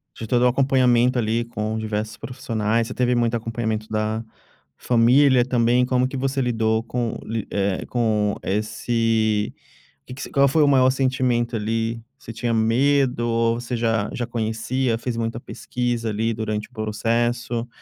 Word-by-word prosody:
De 115 Hz, -, -6 dB
todo 120 Hz, +2 st, +2 dB
o -, -, +6 dB
acompanhamento 125 Hz, -1 st, +3 dB
ali 115 Hz, +1 st, 0 dB
com 110 Hz, -2 st, -3 dB
diversos 110 Hz, 0 st, -3 dB
profissionais, 115 Hz, -2 st, -2 dB
você 125 Hz, -, -6 dB
teve 125 Hz, 0 st, +1 dB
muito 120 Hz, -1 st, +1 dB
acompanhamento 110 Hz, -1 st, -3 dB
da 110 Hz, +1 st, -1 dB, 0.5 s
família 125 Hz, +2 st, +4 dB
também, 125 Hz, 0 st, +2 dB
como 125 Hz, 0 st, +1 dB
que 135 Hz, +1 st, -5 dB
você 135 Hz, +1 st, -1 dB
lidou 110 Hz, -2 st, +1 dB
com 120 Hz, 0 st, -3 dB
li 110 Hz, -1 st, -4 dB
eh, 100 Hz, -1 st, -1 dB
com 110 Hz, -4 st, 0 dB
esse 110 Hz, 0 st, 0 dB, 0.5 s
que 125 Hz, -, -9 dB
que 130 Hz, -, -9 dB
se -, -, -6 dB
qual 140 Hz, 0 st, +4 dB
foi 150 Hz, +3 st, +3 dB
o -, -, +4 dB
maior 130 Hz, -2 st, +5 dB
sentimento 130 Hz, -3 st, 0 dB
ali, 115 Hz, +1 st, -2 dB, 0.2 s
você 135 Hz, -4 st, -10 dB
tinha 115 Hz, +1 st, -2 dB
medo 125 Hz, +3 st, +2 dB
ou 115 Hz, 0 st, +1 dB
você 120 Hz, +1 st, -4 dB
já 115 Hz, -2 st, 0 dB
já 120 Hz, -, -2 dB
conhecia, 115 Hz, +2 st, -1 dB
fez 120 Hz, 0 st, -4 dB
muita 115 Hz, 0 st, -2 dB
pesquisa 120 Hz, -2 st, -3 dB
ali 110 Hz, +2 st, -1 dB
durante 110 Hz, -1 st, -3 dB
o -, -, -30 dB
processo, 115 Hz, +2 st, -1 dB
115 Hz, 160 wpm, -22 LUFS, 110-125 Hz, 0.5 s, o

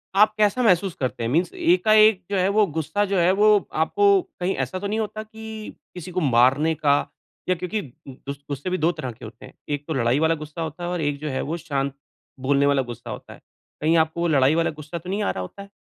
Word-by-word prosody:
आप 215 Hz, +2 st, +5 dB
कैसा 215 Hz, +4 st, +2 dB
महसूस 185 Hz, -3 st, +3 dB
करते 130 Hz, -3 st, -2 dB
हैं? 115 Hz, -, -1 dB
मीन्स 170 Hz, +7 st, +1 dB
एका-एक 220 Hz, -, +4 dB
जो 200 Hz, -, +1 dB
है 185 Hz, 0 st, +2 dB
वो 210 Hz, +1 st, +4 dB
गुस्सा 160 Hz, +7 st, 0 dB
जो 200 Hz, -1 st, -1 dB
है, 175 Hz, +1 st, +4 dB
वो 210 Hz, +1 st, +4 dB, 0.2 s
आपको 400 Hz, -, +3 dB, 0.2 s
कहीं 180 Hz, +2 st, -1 dB
ऐसा 185 Hz, -, -6 dB
तो 200 Hz, -, -3 dB
नहीं 215 Hz, +2 st, -1 dB
होता 215 Hz, 0 st, -4 dB
कि 220 Hz, 0 st, -9 dB, 0.2 s
किसी 180 Hz, 0 st, -8 dB
को 185 Hz, -, -1 dB
मारने 135 Hz, +3 st, +3 dB
का 145 Hz, -2 st, +3 dB, 0.5 s
या 185 Hz, -, +3 dB
क्योंकि 180 Hz, +5 st, -3 dB, 0.3 s
गु 135 Hz, +1 st, -7 dB, 0.2 s
गुस्से 140 Hz, +5 st, -4 dB
भी 185 Hz, -, 0 dB
2 165 Hz, +1 st, +2 dB
तरह 150 Hz, -7 st, -6 dB
के 115 Hz, 0 st, -12 dB
होते 110 Hz, +1 st, -11 dB
हैं। -, -, -14 dB, 0.2 s
1 145 Hz, 0 st, -3 dB
तो 160 Hz, -, -2 dB
लड़ाई 125 Hz, 0 st, +1 dB
वाला 160 Hz, +1 st, +2 dB
गुस्सा 155 Hz, +1 st, -8 dB
होता 160 Hz, +2 st, -5 dB
है 175 Hz, -, -2 dB
और 175 Hz, -1 st, -2 dB
1 145 Hz, -1 st, -1 dB
जो 155 Hz, -, -3 dB
है 130 Hz, -, -2 dB
वो 160 Hz, +4 st, -3 dB
शांत 140 Hz, -4 st, -2 dB, 0.5 s
बोलने 140 Hz, +1 st, +2 dB
वाला 140 Hz, -1 st, +3 dB
गुस्सा 120 Hz, -3 st, -8 dB
होता -, -, -8 dB
है। -, -, -16 dB, 0.4 s
कहीं 160 Hz, +2 st, +3 dB
आपको 160 Hz, +1 st, +1 dB
वो 170 Hz, -, +2 dB
लड़ाई 140 Hz, -2 st, +3 dB
वाला 165 Hz, 0 st, +2 dB
गुस्सा 155 Hz, +3 st, -6 dB
तो 175 Hz, +2 st, -9 dB
नहीं 205 Hz, +2 st, -1 dB
आ -, -, +1 dB
रहा 95 Hz, -, -5 dB
होता 90 Hz, -, -8 dB
है? 200 Hz, -, -11 dB
170 Hz, 245 wpm, -23 LUFS, 145-200 Hz, 0.5 s, आप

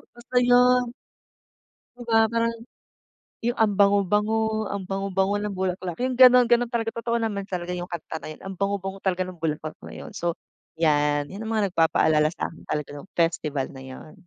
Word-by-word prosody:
Basta 250 Hz, +1 st, -1 dB
yun. 245 Hz, 0 st, +4 dB, 1.0 s
'Di 245 Hz, -, -10 dB
ba 225 Hz, -1 st, +4 dB
parang 230 Hz, 0 st, 0 dB, 0.9 s
yung 240 Hz, +1 st, -1 dB
ang 215 Hz, -2 st, +3 dB
bango-bango, 210 Hz, +2 st, +2 dB
ang 200 Hz, -1 st, -4 dB
bango-bango 195 Hz, +1 st, -1 dB
ng 205 Hz, -2 st, -4 dB
bulaklak 185 Hz, -2 st, -3 dB
yung 255 Hz, +1 st, -1 dB
gano'n, 250 Hz, -1 st, +7 dB
gano'n 240 Hz, 0 st, +2 dB
talaga 225 Hz, -2 st, -2 dB
totoo 235 Hz, 0 st, -1 dB
naman 210 Hz, -3 st, -2 dB
talaga 180 Hz, -1 st, -3 dB
yung 175 Hz, 0 st, -5 dB
kanta 165 Hz, -2 st, -6 dB
na -, -, -8 dB
yun 155 Hz, -, -10 dB
ang 195 Hz, -, -5 dB
bango-bango 195 Hz, 0 st, -3 dB
talaga 185 Hz, -1 st, 0 dB
ng 180 Hz, -3 st, -10 dB
bulaklak 155 Hz, -1 st, -2 dB
na -, -, -10 dB
yun. -, -, -9 dB
So, 170 Hz, -1 st, -2 dB, 0.4 s
'yan 145 Hz, -2 st, +2 dB
'yan 200 Hz, +3 st, -8 dB
ang 220 Hz, -, -5 dB
mga 215 Hz, -2 st, +1 dB
nagpapaalala 155 Hz, -1 st, +3 dB
sa -, -, -3 dB
akin 165 Hz, -, -14 dB
talaga 150 Hz, -2 st, -2 dB
nong 160 Hz, +7 st, -11 dB
festival 155 Hz, -5 st, 0 dB
na 130 Hz, -, -10 dB
yun. 130 Hz, +4 st, -11 dB
195 Hz, 180 wpm, -25 LUFS, 170-225 Hz, 1.0 s, gano'n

